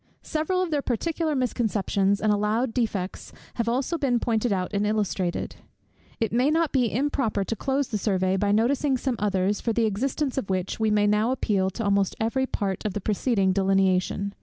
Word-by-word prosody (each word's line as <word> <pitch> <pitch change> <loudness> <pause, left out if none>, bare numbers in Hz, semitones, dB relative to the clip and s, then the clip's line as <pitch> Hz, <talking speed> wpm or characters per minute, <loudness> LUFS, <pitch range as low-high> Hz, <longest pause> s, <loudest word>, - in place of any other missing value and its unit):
Several 340 +4 0
of 350 - -4
their 295 -2 +1
particular 310 +5 -1
misconceptions 205 -5 0
and 215 - +2
allowed 215 +4 0
defects 205 -6 -2 0.3
have 230 -1 0
also 265 +7 -1
been 250 -4 +1
pointed 230 0 0
out 185 0 -1
and 200 0 +1
illustrated. 200 -4 -1 0.6
It 225 -2 -1
may 250 +4 +3
not 320 0 +1
be 250 -5 +1
improper 255 -5 0
to 225 - -3
close 270 +4 -1
the 210 - -2
survey 190 -2 +1
by 200 +1 +1
noticing 260 +5 +2
some 255 0 -1
others, 200 0 0
for 230 - 0
the 230 0 +2
existence 265 +6 -1
of 205 - -7
which 185 +1 -2
we 220 -1 +2
may 210 -1 +3
now 210 +2 +2
appeal 200 -7 0
to 225 +5 -5
almost 200 -2 +1
every 260 +4 0
part 195 -6 -2
of 210 -3 -2
the 205 - -2
preceding 205 -1 +1
delineation. 195 0 +1
220 Hz, 185 wpm, -25 LUFS, 200-260 Hz, 0.6 s, may